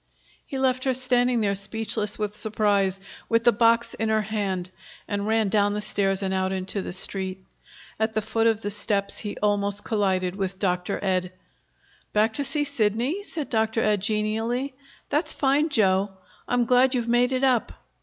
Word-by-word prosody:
He 270 - -4
left 260 -1 +1
her 260 -1 +2
standing 245 -1 +2
there 200 -2 +1
speechless 210 +1 -1
with 210 -1 -3
surprise, 205 -3 +1 0.3
with 230 0 +2
the 240 - +6
box 230 +1 +3
in 220 +1 -2
her 215 0 +2
hand, 195 -4 -3 0.4
and 205 0 -2
ran 220 -1 +2
down 205 0 +2
the - - -1
stairs 195 -1 0
and 190 0 -1
out 190 0 0
into 190 +1 -3
the - - -5
Street. 190 0 -2 0.5
At 220 0 0
the 215 - +2
foot 225 +1 +1
of 225 -1 +1
the 205 - -3
steps 200 -1 -1
he 205 -2 -5
almost 205 -1 +1
collided 190 -4 0
with 195 -1 -3
Dr. 180 0 -1
Ed. 185 -2 0 0.8
"Back 215 +1 +3
to 285 - -2
see 280 +2 0
Sidney?" 265 - 0
said 315 -7 -5
Dr. 220 0 +1
Ed 210 -2 +2
genially. 225 +5 -1 0.4
"That's 295 +4 +1
fine, 285 +3 +2
Joe. 200 -6 +2 0.4
I'm 245 -1 +2
glad 255 +2 +4
you've 240 -2 -1
made 240 +2 +3
it 260 0 0
up." 255 -4 +2
215 Hz, 175 wpm, -25 LUFS, 200-240 Hz, 0.8 s, the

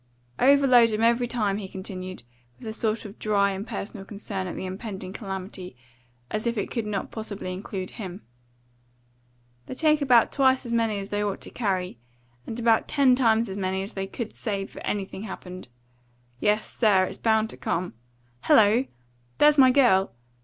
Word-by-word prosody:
"Overload 255 -4 +6
'em 215 +1 0
every 235 +1 +3
time," 210 -5 0
he 205 -2 -5
continued, 185 - -7 0.3
with - - -10
a 220 - -4
sort 220 0 -1
of 205 +1 -10
dry, 200 -2 +2
impersonal 200 +1 -6
concern 195 -2 -5
at 175 - -5
the - - -5
impending 190 -1 -6
calamity, 190 - -6 0.6
as 215 +2 -2
if 235 -1 -1
it 205 - -2
could 230 -3 -2
not 205 -2 -3
possibly 205 -4 -5
include 185 0 -5
him. 190 -3 -8 1.4
"They - - -6
take 305 +1 +3
about 250 -4 +5
twice 265 -2 +3
as 235 - -4
many 225 -3 +1
as 200 0 -6
they 205 0 -1
ought 200 -2 -2
to - - -10
carry, 185 - -2 0.5
and 230 - -5
about 230 -1 +3
ten 275 -3 +4
times 230 -2 +3
as 195 - -6
many 190 0 -1
as 200 - -7
they 195 0 -4
could 225 +2 -6
save 200 -4 -4
if - - -8
anything 195 -1 -3
happened. 185 - -8 0.7
Yes, 210 +6 +1
sir, 205 -5 +4
it's 185 - -5
bound 220 -1 +2
to - - -11
come. 175 +2 -2 0.5
Hello! 220 +4 +5 0.5
There's 295 0 +5
my 260 -1 +8
girl!" 245 -8 +4
210 Hz, 175 wpm, -25 LUFS, 190-235 Hz, 1.4 s, my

